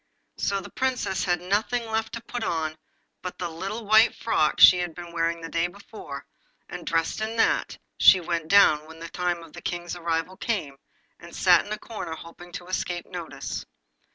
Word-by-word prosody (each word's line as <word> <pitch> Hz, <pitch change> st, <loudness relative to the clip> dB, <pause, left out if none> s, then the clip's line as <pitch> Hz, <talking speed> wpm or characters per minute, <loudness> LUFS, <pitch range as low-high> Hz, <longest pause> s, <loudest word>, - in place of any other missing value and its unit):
So 200 Hz, 0 st, 0 dB
the -, -, -11 dB
Princess 255 Hz, -7 st, -1 dB
had 175 Hz, -2 st, +1 dB
nothing 215 Hz, +6 st, 0 dB
left 220 Hz, 0 st, -2 dB
to 235 Hz, -, -6 dB
put 240 Hz, 0 st, -5 dB
on 160 Hz, -4 st, -1 dB, 0.5 s
but 180 Hz, -, -6 dB
the 175 Hz, -2 st, -4 dB
little 195 Hz, +7 st, -5 dB
white 220 Hz, +2 st, +6 dB
frock 155 Hz, -9 st, +1 dB
she 180 Hz, -, +9 dB
had 175 Hz, -2 st, -3 dB
been 175 Hz, -1 st, -8 dB
wearing 165 Hz, 0 st, -1 dB
the 165 Hz, -, -5 dB
day 165 Hz, +1 st, 0 dB
before; 175 Hz, -6 st, -10 dB, 0.4 s
and 180 Hz, -2 st, -8 dB
dressed 165 Hz, +5 st, 0 dB
in 220 Hz, +1 st, -3 dB
that, -, -, +2 dB, 0.2 s
she 190 Hz, -, +8 dB
went 170 Hz, -2 st, -2 dB
down 155 Hz, -6 st, +5 dB
when 160 Hz, 0 st, -12 dB
the 165 Hz, 0 st, -8 dB
time 175 Hz, -1 st, -2 dB
of 165 Hz, -, -14 dB
the -, -, -9 dB
King's 175 Hz, 0 st, -4 dB
arrival 170 Hz, +2 st, -2 dB
came, 150 Hz, -12 st, -2 dB, 0.4 s
and -, -, -12 dB
sat -, -, +5 dB
in -, -, -9 dB
a 215 Hz, -, -1 dB
corner 210 Hz, -8 st, -6 dB
hoping 170 Hz, +2 st, -12 dB
to 175 Hz, -, -6 dB
escape 180 Hz, -1 st, -3 dB
notice. 175 Hz, -3 st, -6 dB
175 Hz, 190 wpm, -26 LUFS, 165-205 Hz, 0.5 s, she